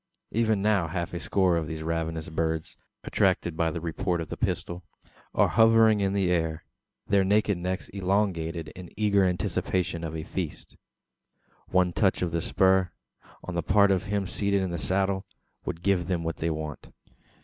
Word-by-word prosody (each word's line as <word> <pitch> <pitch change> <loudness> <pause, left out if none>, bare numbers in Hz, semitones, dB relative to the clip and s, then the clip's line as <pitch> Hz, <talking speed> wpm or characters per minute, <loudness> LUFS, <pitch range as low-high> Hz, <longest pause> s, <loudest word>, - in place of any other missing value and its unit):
Even 110 -3 +1
now 100 -5 +2
half 85 +1 -3
a 85 - -3
score 90 +1 +2
of 80 -2 -2
these 80 0 -5
ravenous 80 -1 -2
birds, 80 0 -2 0.3
attracted 85 -2 +1
by 80 0 +1
the 80 - -4
report 85 +2 -2
of 80 - -5
the - - -4
pistol, 85 +1 -3 0.5
are - - +5
hovering 115 -2 +5
in 95 0 +1
the 95 -3 +1
air 80 -2 0 0.4
their 100 -1 +3
naked 105 +1 +2
necks 90 +2 -3
elongated 90 -5 -1
in 90 +1 -10
eager 100 -2 +3
anticipation 90 -1 -1
of 80 -1 -4
a 80 - -4
feast! 85 -2 -5 0.9
One 90 -1 +2
touch 95 -2 +2
of 85 - -1
the 85 0 -1
spur, 95 +1 +3 0.5
on 90 - -6
the 85 - 0
part 100 +4 +4
of 95 -1 +1
him 100 -1 0
seated 100 0 0
in 95 - -2
the 85 - -3
saddle, 95 +5 0 0.4
would 85 - -5
give 95 -4 +2
them 90 -3 -1
what 80 0 -3
they 85 - -1
want. 75 -2 -5
90 Hz, 175 wpm, -27 LUFS, 80-100 Hz, 0.9 s, are